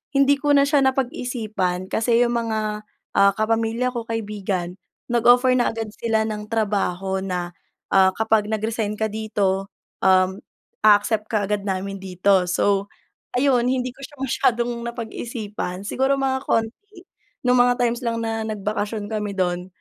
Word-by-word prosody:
hindi 275 +1 +4
ko 290 0 +2
na 280 - +6
siya 290 0 +3
napag-isipan, 240 - -1
kasi 230 +1 +3
yung 240 0 0
mga, 215 -2 -3 0.3
ah, 200 0 +6
kapamilya 225 +3 0
ko, 235 -2 -5
kaibigan, 200 -5 -3 0.3
nag-offer 245 +2 +5
na 240 - +2
agad 225 -2 -4
sila 220 0 0
ng 210 -1 -4
trabaho 195 -4 -1
na, 180 -2 -3 0.4
ah, 190 -1 +6
kapag 220 -1 +2
nag-resign 220 0 -2
ka 220 0 -2
dito, 200 -3 -1 0.3
um, 190 0 +3 0.5
a-accept 210 +1 +4
ka 215 -2 0
agad 205 0 -2
namin 195 +1 -3
dito. 185 0 +2
So 200 +2 +1 0.5
ayun, 250 -2 +3
hindi 255 0 0
ko 255 - -23
siya 275 +2 -9
masyadong 240 -1 +1 0.2
napag-isipan. 220 -5 -5
Siguro 265 +6 +1
mga 270 -1 0
konti, 350 - -2 0.4
nung 250 0 +4
mga 245 0 +5
times 235 0 0
lang 230 -2 -2
na 225 -1 -2
nagbakasyon 210 0 -3
kami 210 -2 -3
dun. 180 -1 -1
220 Hz, 145 wpm, -22 LUFS, 200-240 Hz, 0.5 s, na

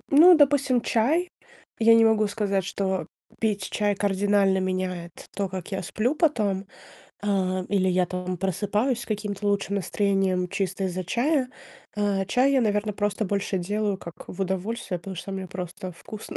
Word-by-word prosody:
ну, 335 +5 +8
допустим, 280 -4 +3
чай. 275 +11 +1 0.5
Я 230 0 +6
не 225 - +6
могу 220 -1 +4
сказать, 200 -2 -1
что 190 -1 -2 0.3
пить 210 -3 0
чай 205 -1 +1
кардинально 200 0 +2
меняет 185 -2 -2 0.2
то, 200 -2 -1
как 185 +1 -7
я 190 0 -2
сплю 215 - -1
потом. 215 - +1 0.6
А, 190 -2 0
или 190 -2 +2
я 180 0 +2
там 180 0 -4
просыпаюсь 205 - 0
с - - -8
каким-то 210 -1 -3
лучшим 200 0 0
настроением 195 -2 0
чисто 190 +1 -2
из-за 185 0 -3
чая. 255 - +1 0.5
А, 200 -2 +1
чай 260 +6 +3
я, 265 - +4
наверно, 210 -1 0
просто 205 +1 -1
больше 200 0 -1
делаю 205 +2 -1
как 170 -2 -11
в 190 - -8
удовольствие. 190 +1 -2
Потому 190 +2 -8
что 195 +3 -6
мне 190 -1 -4
просто 180 0 -6
вкусно 215 +5 -9
200 Hz, 160 wpm, -25 LUFS, 185-220 Hz, 0.6 s, ну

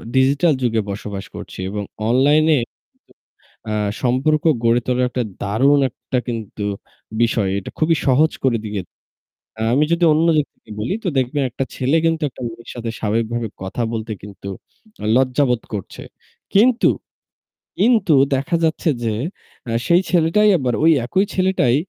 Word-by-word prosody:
Digital 140 +5 +4
যুগে 115 -3 +1
বসবাস 100 0 -5
করছি - - -9
এবং 105 +1 -3 0.3
অনলাইনে 150 +5 +4
কিন্তু 120 - -6 1.0
আ - - -1 0.3
সম্পর্ক 135 +5 +1 0.2
গড়ে 115 +1 +4
তোলার 125 0 +1
একটা 125 -1 -2 0.2
দারুণ 135 +8 +3
একটা 125 - -4
কিন্তু 110 -3 -5 0.6
বিষয়। 115 -4 +2
এটা - - -8
খুবই 165 +1 +3
সহজ 145 +4 +4
করে 125 -3 +2
দিয়েছে। 100 -4 -5 0.8
আমি 145 - +4
যদি 170 +1 +2
অন্য 160 +2 +2
দিক 150 - +2
থেকে - - -17
বলি 110 - -1
তো - - -2
দেখবেন 130 +3 0
একটা 125 +3 -3
ছেলে 130 +5 +1
কিন্তু 165 0 +1
একটা 130 - -13
মেয়ের 115 0 -10
সাথে 120 -1 -4
স্বাভাবিকভাবে 115 +2 -1 0.2
কথা 95 +5 -4
বলতে 110 0 -4
কিন্তু 100 -1 -10 0.7
লজ্জাবোধ 130 -1 +2
করছে। 100 -3 -6 0.5
কিন্তু, 230 +4 +4 0.9
কিন্তু 215 -5 +4 0.2
দেখা 135 +5 -1
যাচ্ছে 160 +1 +1
যে 115 - 0 0.6
আ - - -2 0.2
সেই 175 +2 +5
ছেলেটাই 180 +5 +3
আবার 130 -5 -1
ওই 165 - +6
একই 190 +10 +1
ছেলেটাই 185 -10 +2
130 Hz, 145 wpm, -20 LUFS, 115-155 Hz, 1.0 s, ওই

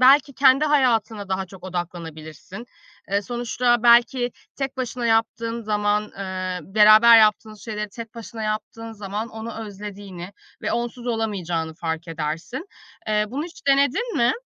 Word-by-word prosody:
belki 275 +1 +6
kendi 270 +1 +5
hayatına 230 -8 +1
daha 190 0 -2
çok 185 0 -14
odaklanabilirsin. 170 +1 -7 0.5
Eee, 200 +1 +1
sonuçta 240 0 0
belki 245 +1 +5 0.3
tek 270 -1 -3
başına 250 -1 -3
yaptığın 230 +1 0
zaman, 210 0 +1 0.2
eee, 185 -1 -3
beraber 215 +4 +7
yaptığınız 215 0 +2
şeyleri 210 -2 -4
tek 230 +2 -9
başına 230 -1 -8
yaptığın 215 +1 -4
zaman 210 +1 -5
onu 225 +1 -7
özlediğini 200 -2 -8 0.3
ve - - -1
onsuz 240 +1 -3
olamayacağını 180 -9 -2
fark 165 +1 -4
edersin. 165 - -4 0.4
Eee, 210 0 +2
bunu 275 +7 -3
hiç 335 -4 -13
denedin 280 - +2
mi? 235 +1 +3
220 Hz, 135 wpm, -23 LUFS, 190-240 Hz, 0.5 s, beraber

